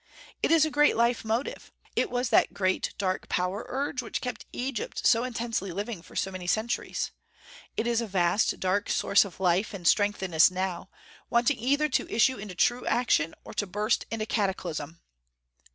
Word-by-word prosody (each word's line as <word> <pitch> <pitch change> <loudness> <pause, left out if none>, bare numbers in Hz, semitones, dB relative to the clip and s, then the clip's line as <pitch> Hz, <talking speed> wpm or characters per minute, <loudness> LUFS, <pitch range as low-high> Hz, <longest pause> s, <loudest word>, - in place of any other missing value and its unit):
It - - +2
is 325 -2 +5
a 315 - -3
great 295 -3 +4
life 235 +1 +2
motive. 225 +5 -3 0.2
It - - +1
was 245 0 -1
that - - +3
great 185 -1 0
dark 185 -2 -2
power 185 +4 -1
urge 270 0 -2
which 230 - -4
kept 250 -1 -6
Egypt 250 -2 -4
so 230 0 +5
intensely 230 -6 -3
living 205 +1 -4
for - - -16
so 190 - -1
many 185 -1 -7
centuries. 220 +6 -1 0.7
It 220 - 0
is 235 0 +1
a 230 - -3
vast 185 +1 +1
dark 190 +2 0
source 200 - +4
of 190 -3 -11
life 190 +3 +1
and 175 -3 -3
strength 205 0 +3
in 185 -3 -4
us 160 +3 +7
now, 185 0 -3 0.4
waiting 240 +3 +2
either 285 +5 +2
to - - -1
issue 255 +3 +3
into 200 -2 -8
true 240 +7 +1
action, 225 -10 +2
or - - -10
to 205 - -2
burst 210 +4 0
into 225 -1 -2
cataclysm. 175 -7 -2
210 Hz, 185 wpm, -28 LUFS, 185-240 Hz, 0.7 s, us